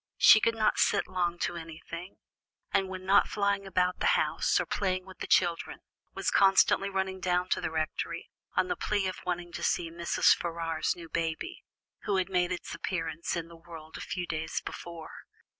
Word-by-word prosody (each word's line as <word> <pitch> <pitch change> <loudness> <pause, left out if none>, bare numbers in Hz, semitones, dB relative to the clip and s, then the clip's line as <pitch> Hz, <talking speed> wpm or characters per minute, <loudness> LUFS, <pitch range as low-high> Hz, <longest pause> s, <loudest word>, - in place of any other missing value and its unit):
She - - +8
could 230 +1 +1
not 220 -1 +2
sit 200 - +3
long 175 -2 -1
to - - -1
anything, 165 +2 -8 0.6
and 190 -1 +1
when 185 0 -7
not 200 +1 +5
flying 200 -1 0
about 180 -1 +1
the - - +1
house, - - +1
or - - 0
playing 185 -2 -1
with 190 -1 -13
the - - -4
children, 175 -2 +1 0.3
was - - 0
constantly 195 0 +4
running 190 -1 -2
down 180 0 0
to - - +1
the - - -1
Rectory, 160 -1 -3 0.2
on - - +2
the 355 - -1
plea 205 - 0
of 185 - -3
wanting 175 -1 -2
to - - -6
see 165 -2 0
Mrs. 170 +1 +3
Ferrars's 165 -1 -2
new 170 -1 -10
baby, 165 - -3 0.4
who 200 - +1
had 185 0 0
made 180 -1 +1
its 175 - -4
appearance 165 -3 -3
in 170 -1 -3
the 170 - -13
world 165 -2 -11
a - - -6
few 180 -1 -3
days 160 -1 -3
before. 170 -2 -8
180 Hz, 190 wpm, -29 LUFS, 165-190 Hz, 0.6 s, She